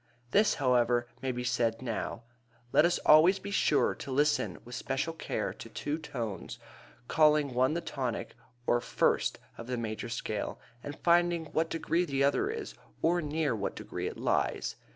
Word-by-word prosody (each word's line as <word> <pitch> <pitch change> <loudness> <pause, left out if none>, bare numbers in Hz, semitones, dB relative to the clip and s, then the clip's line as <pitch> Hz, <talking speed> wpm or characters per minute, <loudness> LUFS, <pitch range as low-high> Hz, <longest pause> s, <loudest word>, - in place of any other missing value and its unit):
This, 210 +7 +4
however, 120 -3 +2 0.2
may 135 -1 -1
be 125 0 -4
said 120 -2 0
now: 115 -1 -4 0.5
Let 155 - +6
us 175 - +2
always 160 +5 +7
be 200 +1 -7
sure 155 -6 +3
to - - -9
listen 145 +2 +1
with 120 - -10
special 135 +7 -2
care 165 - -3
to - - -10
two 150 +2 -3
tones, 120 -10 -5 0.5
calling 150 -3 +4
one 130 +5 +2
the 170 - -1
tonic, 130 -7 -3 0.3
or 120 -1 +2
first, - - +1 0.2
of 115 - -7
the 125 -1 -2
major 115 0 -4
scale 110 -3 -3 0.2
and 145 +2 -7
finding 170 -2 +2
what 165 +1 +1
degree 165 +1 0
the 140 -3 0
other 140 - +2
is, 445 0 -5 0.3
or 175 +2 +3
near 150 -4 0
what 100 -2 -3
degree - - -5
it - - -6
lies. - - 0
145 Hz, 170 wpm, -30 LUFS, 120-165 Hz, 0.5 s, always